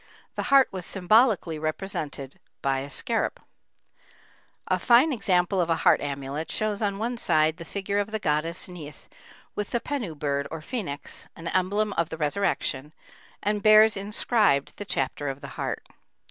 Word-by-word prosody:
The - - -3
heart 275 -1 +7
was 185 -2 -5
symbolically 195 -3 +3
represented 155 -4 -4 0.2
by 135 -1 +1
the 140 - -7
scarab. 225 - -1 1.3
A - - +1
fine 255 +5 +5
example 185 -4 +2
of 170 - -1
a 165 - +3
heart - - +6
amulet 140 +2 -4
shows 215 -1 -1
on 200 -2 0
one 235 +3 -2
side 155 -6 +2
the 170 - -8
figure 200 +3 -2
of 205 +1 -1
the 220 - -2
goddess 165 -1 -1
Neith 160 -5 -10 0.5
with 210 - -3
the 240 - 0
pennu 235 - -4
bird 140 -1 -1
or 165 - -5
phœnix, 155 - -5
an 165 0 -5
emblem 200 +3 +1
of 170 -2 0
the 160 - -5
resurrection, 150 -3 -1 0.5
and 210 +1 0
bears 215 +1 +7
inscribed 200 - +1
the 205 - -6
chapter 135 -3 -2
of 135 0 -5
the 140 - -7
heart. - - -4
180 Hz, 160 wpm, -26 LUFS, 150-210 Hz, 1.3 s, heart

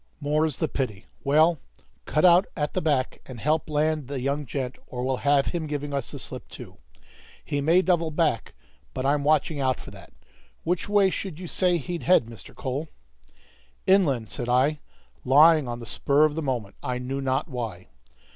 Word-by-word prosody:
"More's 150 0 0
the - - 0
pity. 110 -7 -4 0.2
Well, 155 +3 +4 0.5
cut 155 +3 +2
out 180 +2 +6
at 150 -1 -1
the 185 - 0
back 140 -5 0
and 125 -3 -9
help 155 +5 0
land 155 -1 0
the 140 -1 -4
young 140 +2 -2
gent, 130 -1 -4
or 125 -1 -5
we'll 130 0 0
have 140 0 +3
him 165 -3 -2
giving 145 -1 -4
us 140 -3 -2
the - - -7
slip - - -9
too. - - -11 0.7
He 145 - -1
may 170 +6 +4
double 170 -3 +2
back, 155 -7 -1 0.4
but 130 - -2
I'm 140 +1 +2
watching 150 0 +2
out 130 -2 +1
for - - -10
that. - - -14 0.5
Which 180 +3 -1
way 200 -2 +4
should 185 -5 -5
you 185 - -7
say 180 +1 +1
he'd 170 +3 -5
head, 180 -9 +4
Mr. 115 -1 -12
Cole?" 140 +4 -3 1.0
"Inland," 140 - +3
said 120 - -4
I, 135 +5 +2 0.4
lying 150 +2 +6
on 120 0 -4
the 115 - -8
spur 140 +6 +2
of 155 - 0
the 160 - -3
moment, 120 -8 -3
I 125 0 -2
knew 130 +2 -4
not 130 0 0
why. 115 -8 -6
145 Hz, 185 wpm, -25 LUFS, 130-160 Hz, 1.0 s, out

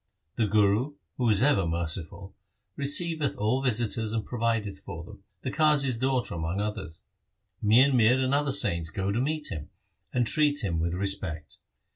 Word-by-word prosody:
The 110 - 0
Guru, 105 +7 +2 0.2
who 120 -2 +1
is 105 +2 +3
ever 100 -11 +3
merciful, 85 +3 -4 0.4
receiveth 150 +2 +1
all 110 +6 0
visitors 115 -3 -1
and 110 -2 -2
provideth 115 -4 -2
for 85 -4 -8
them, - - -14 0.2
the - - -3
Qazi's 145 -6 +3
daughter 130 -1 0
among 85 +3 -3
others. 105 -6 -5 0.6
Mian 125 +6 +5
Mir 120 +1 +4
and 130 +1 0
other 145 0 +1
saints 90 - +2
go 95 +4 -2
to 115 +4 0
meet 150 +2 -2
him, 75 -2 -6 0.4
and 125 -1 +1
treat 145 +2 +2
him 85 -5 -1
with 85 +1 -1
respect. 95 -5 -3
110 Hz, 160 wpm, -27 LUFS, 95-130 Hz, 0.6 s, Mian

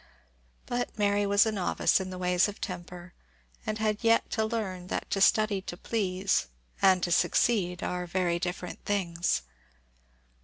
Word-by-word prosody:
But 245 -2 -3
Mary 205 -1 +2
was 200 +1 +5
a 220 - 0
novice 195 -2 +1
in 190 -1 -4
the 185 - -6
ways 180 +1 +2
of 205 +1 -8
temper, 180 -1 -7 0.5
and 215 - -1
had 215 0 -1
yet 230 0 +3
to 220 - 0
learn 205 -5 -3
that - - -3
to 195 - 0
study 215 -2 +4
to 175 - -7
please, 195 - 0 0.3
and 185 -2 +5
to 175 - 0
succeed, 180 -1 +2
are 180 0 -3
very 175 -1 0
different 180 0 -5
things. 170 - 0
190 Hz, 155 wpm, -28 LUFS, 180-215 Hz, 0.5 s, was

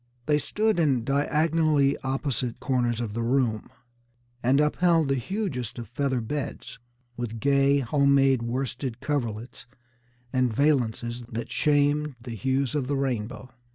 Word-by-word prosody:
They 150 -1 +2
stood 215 +5 0
in 135 -7 +2
diagonally 150 +1 +2
opposite 130 -2 -2
corners 120 -4 0
of 115 -4 -3
the 115 - -2
room, 115 -2 0 0.7
and 130 +4 +3
upheld 165 0 +3
the - - +3
hugest 130 - -3
of 120 -2 -6
feather 130 0 -1
beds, 140 +6 -5 0.4
with 115 -2 -4
gay, 140 +1 +3
home 140 +2 +3
made 135 -2 +4
worsted 125 0 -3
coverlets 120 -5 -3 0.7
and 130 -2 +2
valances 120 -3 0
that 115 +1 -5
shamed 145 -1 +2
the 120 +1 -8
hues 130 +4 -1
of 145 -4 -1
the 140 0 0
rainbow. 125 -1 -3
135 Hz, 135 wpm, -26 LUFS, 120-145 Hz, 0.7 s, made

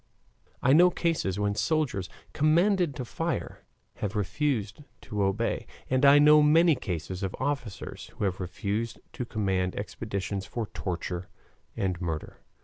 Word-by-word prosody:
I 130 - +5
know 175 +4 +7
cases 165 - -1
when 105 0 +1
soldiers, 125 - 0 0.2
commanded 170 +1 +3
to 130 -4 -4
fire, - - -3 0.4
have 105 +1 -3
refused 105 - -1 0.2
to 105 -1 -3
obey, 100 +4 0 0.2
and 130 +1 +2
I 140 +1 +8
know 150 +1 +7
many 160 +3 +6
cases 90 - -4
of 95 -2 -3
officers 130 -9 -4
who - - -3
have 95 -2 0
refused 100 +5 -3
to 125 - -4
command 95 -5 -1
expeditions 100 -2 -4
for 115 -2 -3
torture 90 -2 -4 0.5
and 90 -2 -1
murder. 80 -3 -4
105 Hz, 140 wpm, -28 LUFS, 95-145 Hz, 0.5 s, I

